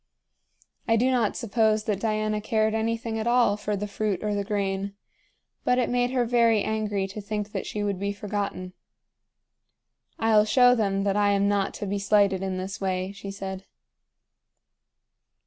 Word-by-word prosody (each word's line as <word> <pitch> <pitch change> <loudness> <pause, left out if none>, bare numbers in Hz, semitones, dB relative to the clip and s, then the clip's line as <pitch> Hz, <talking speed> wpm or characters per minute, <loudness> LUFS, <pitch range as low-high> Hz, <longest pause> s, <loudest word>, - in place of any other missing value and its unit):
I 225 - +4
do 250 +4 +2
not 240 -5 +1
suppose 220 -2 +1
that 210 -3 -1
Diana 215 -1 -1
cared 220 0 +1
anything 225 0 -1
at 220 - -2
all 240 -4 +4
for 210 0 -3
the 205 +1 -3
fruit 205 -2 -2
or 210 -1 0
the 205 0 -1
grain; 200 -1 -2 0.7
but 250 - +2
it 250 -1 +1
made 245 0 +1
her 250 -1 +1
very 230 -3 +3
angry 210 -3 -1
to 200 +2 -7
think 210 0 -4
that - - -4
she 210 - -4
should 200 -2 -1
be 200 +1 -1
forgotten. 200 -2 -4 1.4
"I'll 220 -1 +4
show 245 +3 +5
them 195 -4 0
that 200 0 +1
I 205 -1 +3
am 200 0 +2
not 200 -1 0
to - - -5
be 200 +1 -2
slighted 200 -1 +3
in 190 -1 -2
this 190 +2 -5
way," 185 0 -1
she 200 0 -8
said. 195 -1 -6
210 Hz, 170 wpm, -26 LUFS, 200-220 Hz, 1.4 s, show